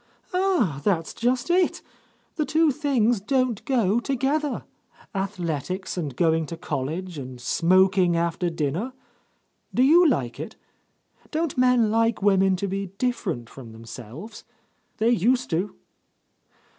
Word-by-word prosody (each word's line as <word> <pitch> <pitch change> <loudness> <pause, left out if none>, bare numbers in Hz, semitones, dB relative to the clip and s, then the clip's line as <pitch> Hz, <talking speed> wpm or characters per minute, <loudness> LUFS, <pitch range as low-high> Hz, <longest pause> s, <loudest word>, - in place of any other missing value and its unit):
"Ah, 360 - +1
that's 170 -6 0
just 250 +5 0
it! 360 0 +2 0.5
The 310 - 0
two 315 +1 +3
things 250 -6 +1
don't 255 -1 0
go 230 -5 +2
together. 275 +3 -1 0.5
Athletics 185 -2 -3
and 150 -8 -4
go 165 +1 +3
ing 160 -1 -1
to 165 - -6
college 160 +4 -4
and 130 -2 -8
smoking 185 +5 +3
after 170 +1 0
dinner 165 - -2 0.4
— - - -45
Do 250 - +4
you 335 +6 +6
like 125 - -1
it? - - -6 0.7
Don't 320 -2 -1
men 250 -4 +3
like 225 0 +2
women 195 -1 +3
to 200 +2 -2
be 195 +1 -3
different 195 - -2
from 115 -2 -11
themselves? 115 - -10 0.5
They 230 +1 +3
used 245 +3 +2
to." 180 +5 -1
195 Hz, 130 wpm, -25 LUFS, 165-255 Hz, 0.7 s, you